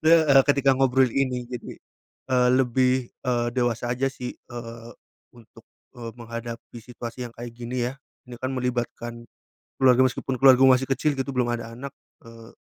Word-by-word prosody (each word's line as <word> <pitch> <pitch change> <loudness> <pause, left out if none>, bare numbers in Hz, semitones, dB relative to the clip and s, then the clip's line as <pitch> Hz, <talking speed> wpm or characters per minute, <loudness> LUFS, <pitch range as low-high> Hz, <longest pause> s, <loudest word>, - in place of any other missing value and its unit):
heeh, 160 -4 +6
ketika 140 -1 +3
ngobrol 130 -1 +3
ini 130 -2 -1
jadi, 125 -2 -6 0.6
eee, 125 -1 +4
lebih, 130 0 +3 0.3
eee, 120 -1 +1
dewasa 120 -1 0
aja 130 +2 -1
sih, 125 -2 -7
eee, 115 -1 -9 0.4
untuk, 115 -1 -18 0.3
eee, 115 -1 -7
menghadapi 115 0 -8
situasi 120 +1 -7
yang 120 - -12
kayak 120 0 -8
gini 120 0 -3
ya. - - -10 0.3
Ini 120 - -8
kan 130 - -3
melibatkan 120 -1 -3 0.5
keluarga 130 -1 +5
meskipun 130 +1 -2
keluargaku 130 0 +7
masih 130 +1 -2
kecil 145 +1 +1
gitu 135 +1 -3
belum 125 -2 0
ada 115 0 -8
anak, 135 +3 -8 0.3
eee, 115 0 -13
125 Hz, 155 wpm, -25 LUFS, 120-130 Hz, 0.6 s, keluargaku